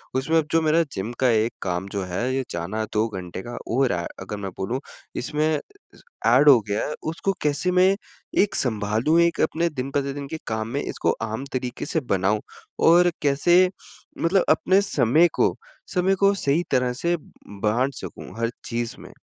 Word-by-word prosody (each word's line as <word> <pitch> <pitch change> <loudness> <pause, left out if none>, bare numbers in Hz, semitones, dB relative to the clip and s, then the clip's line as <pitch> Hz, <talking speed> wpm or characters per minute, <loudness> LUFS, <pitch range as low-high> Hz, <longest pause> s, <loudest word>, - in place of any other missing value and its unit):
उसमें 160 +5 +2
जो 165 - +3
मेरा 160 +1 +3
जिम 100 +5 -3
का 130 - +4
एक 115 0 +2
काम 90 0 -2
जो 100 -2 -2
है, 105 +8 -2
ये 135 - 0
जाना 95 +6 -3
2 110 +1 +2
घंटे 95 -3 -6
का 120 - -6 0.2
और 130 -1 +3
ए, 85 -1 -1
अगर 95 +2 -6
मैं 100 -1 -5
बोलूँ 115 +7 -2 0.4
इसमें 150 +5 0 0.8
एड 135 +5 +6
हो 125 -4 +8
गया 100 +1 -1
है 150 - -3 0.2
उसको 195 +4 -1
कैसे 150 +5 +1
मैं 185 +2 +4 0.5
एक 205 - +1
सँभालूँ 110 +6 +1
एक 170 0 +2
अपने 170 +2 +1
दिन-प्रतिदिन 140 0 -3
के 160 - -3
काम 110 0 -2
में 140 - 0
इसको 85 - 0
आम 115 +5 -4
तरीक़े 125 -1 -3
से 160 - 0
बनाऊँ? 100 +2 +1 0.5
और 175 +2 +6
कैसे 175 +6 +4 0.5
मतलब 185 +2 +3
अपने 190 +5 +4
समय 155 - +4
को - - +2 0.4
समय 190 +1 +2
को 200 +1 +4
सही 160 -1 +1
तरह 125 -1 +2
से 170 +7 0
ब 155 - -19 0.3
बाँट 125 +6 +1
सकूँ - - -8
हर 115 0 0
चीज़ 120 -1 -3
में? - - -12
130 Hz, 180 wpm, -24 LUFS, 110-165 Hz, 0.8 s, हो